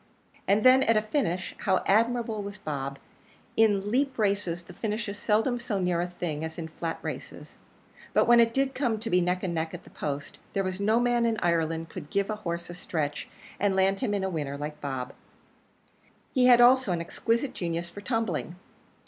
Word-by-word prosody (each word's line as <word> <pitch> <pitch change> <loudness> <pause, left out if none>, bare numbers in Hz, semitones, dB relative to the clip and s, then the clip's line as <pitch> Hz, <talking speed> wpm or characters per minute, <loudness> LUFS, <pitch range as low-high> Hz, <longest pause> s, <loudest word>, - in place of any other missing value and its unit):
And 205 +2 +3
then, 255 +1 +7
at 230 -4 +3
a - - +4
finish, 215 - -1
how 190 -3 +1
admirable 225 +1 +2
was 200 +1 -7
Bob! 140 -7 -4 0.6
In 205 -2 +3
leap 270 +2 +1
races 200 -5 0
the - - -13
finish 215 0 -3
is 200 +1 -6
seldom 225 +4 +1
so 235 -4 -2
near 180 -2 +1
a 175 - -1
thing 170 -4 -4
as 160 0 -5
in 165 -1 -5
flat 165 +1 -4
races; - - -7 0.5
but - - +4
when 240 0 +6
it 230 -1 +5
did 270 +2 0
come 240 -5 0
to 225 +1 -5
be 180 0 +4
neck 180 +1 0
and 180 -3 -1
neck 160 +1 -2
at 175 - -10
the - - -16
post, 145 -1 -5
there 195 - +1
was 185 0 -3
no 215 +3 +3
man 240 -1 +2
in 225 -1 0
Ireland 165 -1 0
could 145 - -8
give 200 +1 0
a 215 - -3
horse 170 -4 -4
a - - -7
stretch 155 -4 -3 0.3
and 200 -1 +2
land 190 +1 +2
him 220 -6 0
in 195 - -1
a 190 - 0
winner 145 -4 -3
like 150 +1 -6
Bob. 130 -3 -4 1.2
He 255 -2 +4
had 240 -1 +7
also 255 -3 +6
an 175 - 0
exquisite 230 +9 -1
genius 170 -1 -3
for 205 - -9
tumbling. 205 -7 -2
195 Hz, 205 wpm, -28 LUFS, 170-230 Hz, 1.2 s, then